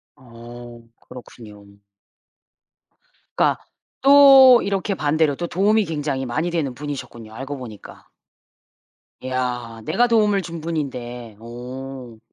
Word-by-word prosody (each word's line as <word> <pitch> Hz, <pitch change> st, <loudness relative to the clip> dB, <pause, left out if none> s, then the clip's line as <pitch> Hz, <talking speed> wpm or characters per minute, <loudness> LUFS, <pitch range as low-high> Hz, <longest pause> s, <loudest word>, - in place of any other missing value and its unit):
어, 120 Hz, -1 st, -13 dB, 0.2 s
그렇군요. 110 Hz, -4 st, -13 dB, 1.7 s
그러니까 -, -, +2 dB, 0.4 s
또 270 Hz, -2 st, +8 dB
이렇게 200 Hz, 0 st, -2 dB
반대로 150 Hz, -1 st, +1 dB
또 175 Hz, +3 st, -4 dB
도움이 205 Hz, +4 st, +2 dB
굉장히 145 Hz, -4 st, -3 dB
많이 160 Hz, +8 st, -2 dB
되는 150 Hz, -7 st, -2 dB
분이셨군요 125 Hz, -5 st, -8 dB
알고 135 Hz, +4 st, -6 dB
보니까. 115 Hz, -5 st, -11 dB, 1.2 s
이야 125 Hz, -3 st, -4 dB
내가 230 Hz, +10 st, +2 dB
도움을 210 Hz, -4 st, +2 dB
준 170 Hz, -1 st, -7 dB
분인데. 125 Hz, -8 st, -5 dB
오. 125 Hz, 0 st, -9 dB
135 Hz, 240 characters per minute, -21 LUFS, 120-170 Hz, 1.7 s, 또